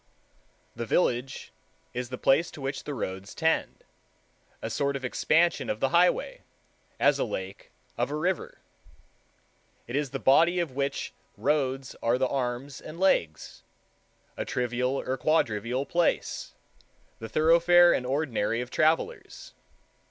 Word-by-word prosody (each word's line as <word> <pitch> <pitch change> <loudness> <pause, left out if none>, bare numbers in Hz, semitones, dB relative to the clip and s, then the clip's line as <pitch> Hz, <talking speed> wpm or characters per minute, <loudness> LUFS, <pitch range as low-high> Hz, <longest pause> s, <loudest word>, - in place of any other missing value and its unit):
The 115 0 -5
village 125 -2 0 0.4
is 125 0 -4
the 125 - -5
place 150 +7 +3
to 145 - -11
which 135 +1 -4
the 145 - -4
roads 95 -3 -5
tend, 160 -1 0 0.8
a - - -5
sort 140 0 0
of 135 -1 -4
expansion 165 +6 +2
of 105 - -2
the 135 - +1
highway, 180 - +2 0.6
as - - +3
a - - +2
lake - - -6 0.3
of - - +1
a 150 - -3
river. 175 +4 -2 1.3
It 120 - -6
is 145 -1 0
the 135 - -4
body 165 +7 +4
of 170 -5 -1
which 140 +1 -3 0.2
roads 135 -3 -1
are 115 +2 +2
the 130 0 +1
arms 130 +1 -3
and 155 +2 -10
legs—a 85 - -3
trivial 125 +2 -1
or 130 - -3
quadrivial 125 -3 0
place, 170 +2 -1 0.6
the 115 - -7
thoroughfare 170 +5 +5
and - - 0
ordinary 125 -5 -1
of 125 +1 -5
travelers. 160 - -1
135 Hz, 135 wpm, -27 LUFS, 125-165 Hz, 1.3 s, thoroughfare